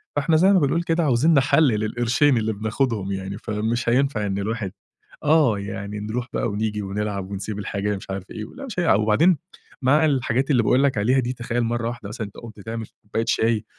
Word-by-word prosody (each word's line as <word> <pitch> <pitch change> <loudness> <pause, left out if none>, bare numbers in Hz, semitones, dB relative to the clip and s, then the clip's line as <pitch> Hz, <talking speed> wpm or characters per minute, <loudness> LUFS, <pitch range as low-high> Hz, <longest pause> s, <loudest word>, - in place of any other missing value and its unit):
فإحنا 145 +3 +2
زي 190 +5 +5
ما 185 - +5
بنقول 165 +4 +1
كده 165 -1 +1
عايزين 140 +5 +3
نحلَّل 145 +2 +4
للقرشين 120 +5 +2
اللي 110 -1 0
بناخُدهُم 110 -1 -1
يعني، 95 +1 -4
فمش 110 +3 -2
هينفَع 125 -4 +1
إن 100 -1 -2
الواحد 105 -2 -3 0.5
آه، 145 -9 +4
يعني 100 +1 -5
نرُوح 115 +4 -3
بقى - - 0
ونيجي 105 0 -2
ونلعَب 100 -1 -3
ونسيب 100 +1 -4
الحاجة 105 0 -2
ال - - -3
مش 95 - -12
عارف 95 -1 -5
إيه. 110 -1 -5
ولأ 275 - -9
مش 225 -8 -5
هيلعَب، 165 - +3
وبعدين 150 +12 +4 0.4
مع 150 +5 +4
الحاجات 130 -1 +1
اللي 125 -5 +3
باقول 130 +5 +3
لك 135 -6 +2
عليها 125 +6 +3
دي، 125 0 -1
تخيَّل 120 0 -2
مرَّة 115 0 -1
واحدة 120 -4 -7
مثلًا 110 -1 -5
أنتَ 100 - -15
قُمت 110 -3 -11
تعمَل 115 +1 -5 0.2
كوباية 110 +2 -2
شاي، 110 -1 +1
115 Hz, 205 wpm, -23 LUFS, 105-135 Hz, 0.5 s, زي